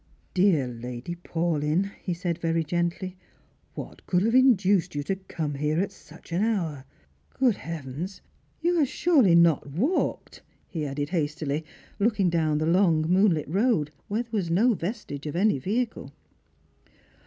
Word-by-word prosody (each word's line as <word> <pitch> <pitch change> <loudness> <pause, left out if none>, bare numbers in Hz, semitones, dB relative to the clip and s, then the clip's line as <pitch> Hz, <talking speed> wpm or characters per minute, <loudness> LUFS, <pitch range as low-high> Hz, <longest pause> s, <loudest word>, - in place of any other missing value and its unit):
" - - -38
Dear 165 -10 +4
Lady 125 +5 -6
Paulyn," 170 +1 -1 0.2
ho 180 - +1
said 170 -1 -3
very 165 -1 0
gently, 175 +3 -2 0.3
" - - -38
what - - -8
could 180 0 +2
have 225 +2 +1
induced 205 - +4
you 145 - -1
to 195 - -1
come 165 -6 -4
here 150 +3 0
at 195 +1 0
such 195 - -16
an 170 +3 0
hour? 170 -11 -1 0.5
Good 250 -6 +2
heavens, 165 +4 -6 0.4
you 345 +1 +2
have 290 - +3
surely 265 - +4
not 170 -4 +4
walked 235 - -1
?" - - -38
he 155 -4 -2
added 145 +1 -3
hastily: 155 -3 -1 0.4
looking 200 -4 +2
down 160 -3 +1
the 155 - 0
long 170 -2 +3
moonlit 180 -1 +3
road, 185 - +1 0.2
where 215 +4 -1
there 235 - -27
was 200 -7 -1
no 220 +9 +4
vastige 175 - -5
of 150 - -4
any 195 -4 +2
vehicle. 225 - -2
175 Hz, 160 wpm, -26 LUFS, 155-205 Hz, 0.5 s, Dear